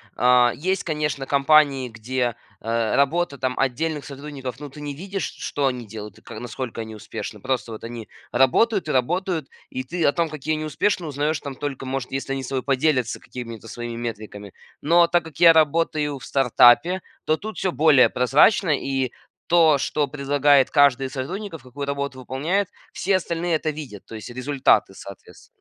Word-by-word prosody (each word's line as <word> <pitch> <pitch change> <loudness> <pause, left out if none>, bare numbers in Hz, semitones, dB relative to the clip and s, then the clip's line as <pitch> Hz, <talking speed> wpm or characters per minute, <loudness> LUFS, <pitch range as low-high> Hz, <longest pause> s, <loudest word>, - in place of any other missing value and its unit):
а, 125 0 +4
есть, 185 +5 -1
конечно, 150 -4 -2
компании, 140 -2 +3
где, 120 +1 -2 0.3
э, 115 -1 0
работа, 145 +1 +1
там, 130 -1 -2
отдельных 145 +3 -1
сотрудников, 140 -2 -7
но 145 - -7
ты 140 - -13
не 145 -1 -4
видишь, 195 +6 -5
ш - - -16
что 140 -1 0
они 125 -2 -3
делают 105 -2 -9
и - - -26
к 110 - -9
насколько 120 0 -5
они 110 0 -8
успешны. 105 0 -7
Просто 120 -3 -2
вот 110 - -9
они 115 -1 -7 0.2
работают 165 - +3
и - - -1
работают, 165 +4 0 0.2
и 130 - -4
ты 170 +5 -2
о 145 - +4
том, 170 -2 0
какие 155 +1 -2
они 155 - -4
успешные, 160 +2 -1
узнаешь, 145 +2 -1
там, 140 -2 -6
только, 135 -1 -5
может, 130 -1 -4
если 135 0 -3
они 135 -1 -3
с - - -6
тобой 130 -1 -2
поделятся 135 -4 +1
какими-то 115 -3 -9
своими 120 0 -6
метриками. 110 -4 -7 0.3
Но 170 +3 +5
так 170 -1 +1
как 155 -3 -11
я 170 -1 +10
работаю 155 -2 +2
в 130 - -13
стартапе, 135 +8 +4 0.2
то 155 - +3
тут 215 +6 -8
всё 190 - 0
более 150 -4 +5
прозрачно, 145 - +4
и 135 -3 0 0.4
то, 165 -4 +5
что 145 +2 -1
предлагает 140 -1 +3
каждый 140 -3 +4
из 130 - -5
сотрудников, 165 +5 -5
какую 130 +3 -7
работу 140 -1 -3
выполняет, 155 +10 -1 0.3
все 195 0 +1
остальные 170 -1 -1
это 155 - -3
видят, 145 -10 -7
то 115 - -9
есть 110 +2 -8
результаты 130 -5 +1
соответственно. 100 0 -12
140 Hz, 185 wpm, -23 LUFS, 125-155 Hz, 0.4 s, я